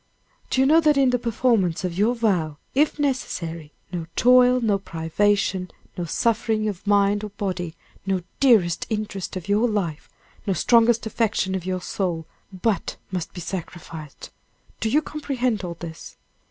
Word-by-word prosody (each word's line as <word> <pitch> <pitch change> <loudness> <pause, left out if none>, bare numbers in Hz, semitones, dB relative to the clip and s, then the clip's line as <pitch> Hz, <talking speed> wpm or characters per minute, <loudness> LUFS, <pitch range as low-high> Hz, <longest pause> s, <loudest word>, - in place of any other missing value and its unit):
"Do - - 0
you 265 - +5
know 310 +4 +6
that 300 -2 +4
in 270 -2 +4
the 250 - +1
performance 225 -7 +1
of 180 -2 -2
your 215 +6 +2
vow, 180 -10 0 0.2
if 295 +3 +2
necessary, 170 - -2 0.2
no 170 -3 -4
toil, 250 0 +6
no 210 -4 +1
privation, 190 +2 0 0.3
no 175 - -3
suffering 220 +3 0
of 200 -1 -5
mind 205 0 +3
or 210 - -4
body, 185 -4 -4 0.3
no 190 -2 0 0.2
dearest 215 -11 +4
interest 210 -4 -3
of 185 -3 -6
your 210 +4 +3
life, 175 -8 -2 0.4
no 195 - +2
strongest 235 +3 +4
affection 215 -3 0
of 185 -1 -3
your 185 -1 -1
soul, 175 -4 -2 0.3
but 190 0 -1 0.2
must 180 -3 -3
be 180 - -8
sacrificed; 165 -4 -7 0.5
do 225 - 0
you 300 +6 +3
comprehend 255 -8 -2
all 170 -1 -4
this?" 160 -2 -9
205 Hz, 155 wpm, -24 LUFS, 180-235 Hz, 0.5 s, know